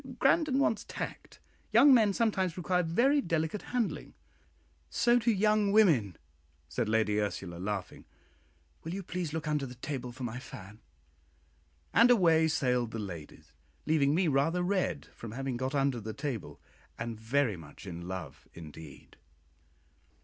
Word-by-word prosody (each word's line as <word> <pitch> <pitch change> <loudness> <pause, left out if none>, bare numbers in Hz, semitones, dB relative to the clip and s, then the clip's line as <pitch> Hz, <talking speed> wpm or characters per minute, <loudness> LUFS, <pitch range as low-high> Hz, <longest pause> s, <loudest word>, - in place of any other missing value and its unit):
Grandon 305 -5 +3
wants 225 -6 +1
tact. - - -7 0.3
Young 280 -1 +7
men 220 -5 +5
sometimes 195 -5 0
require 180 +1 +1
very 245 - +3
delicate 165 - -1
handling." 245 -3 -3 0.7
"So 240 0 +3
do 235 0 0
young 210 -1 +3
women," 150 - +4 0.5
said 105 - -2
Lady 110 -1 +2
Ursula, 95 -4 -4
laughing. 95 -1 -4 0.8
"Will 165 +3 -4
you 195 - -5
please 175 -3 -4
look 160 -1 -4
under 150 -3 0
the 125 - -10
table 125 0 -5
for 130 +2 -9
my 120 +1 -4
fan?" 105 -4 -11 1.1
and 230 +3 +6
away 165 -8 +5
sailed 125 -6 +1
the 115 - -6
ladies, 85 -8 -8 0.3
leaving 150 -2 +3
me 180 +1 +2
rather 155 +5 +1
red 180 -5 -1
from 115 -2 -9
having 135 0 -3
got 130 +3 -2
under 135 -3 +1
the 110 0 -6
table, 135 - -5 0.4
and 115 -1 -5
very 115 0 +1
much 75 0 -12
in 85 -2 -7
love 90 -5 -7
indeed. 80 -3 -12
145 Hz, 145 wpm, -30 LUFS, -, 1.1 s, Young